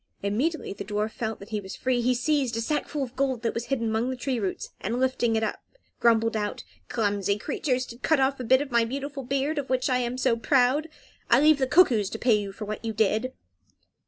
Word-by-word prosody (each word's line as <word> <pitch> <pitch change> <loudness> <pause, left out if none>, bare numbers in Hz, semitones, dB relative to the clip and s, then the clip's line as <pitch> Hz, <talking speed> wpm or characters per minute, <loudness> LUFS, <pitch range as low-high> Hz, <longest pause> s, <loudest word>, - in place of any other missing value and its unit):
Immediately 245 +9 -1
the 200 - -6
dwarf 210 +2 -2
felt 225 -3 -4
that 200 - -12
he 215 -2 -2
was 190 -1 -8
free 255 -2 0
he 250 +1 +2
seized 255 -2 0
a - - 0
sackful 295 +3 -1
of 255 0 -7
gold 260 -3 -1
that 230 - 0
was 230 +1 -3
hidden 235 -5 -1
among 220 +3 0
the 260 - -2
tree 255 -1 -2
roots, 195 -3 -3
and, 230 +5 -2
lifting 255 -3 +1
it 220 - +1
up, 220 - -2 0.4
grumbled 225 -1 +3
out, 210 -1 -2 0.3
"Clumsy 205 -3 0
creatures, 255 +1 -1
to 235 -1 -11
cut 315 +2 +2
off 270 0 +1
a - - -3
bit 260 +3 +4
of 280 - -11
my 235 -1 +4
beautiful 275 +4 -4
beard, 275 +4 -1
of 275 - -5
which 255 0 +1
I 250 - +3
am 245 0 -2
so 255 -2 +2
proud! 265 +5 +2 0.4
I - - +6
leave 305 0 +5
the 265 - +1
cuckoos 245 - +4
to - - -5
pay 240 0 +3
you 205 -2 0
for 210 +2 -7
what 215 +2 -5
you 225 -1 -2
did." 220 +4 +1
245 Hz, 235 wpm, -26 LUFS, 220-265 Hz, 0.4 s, I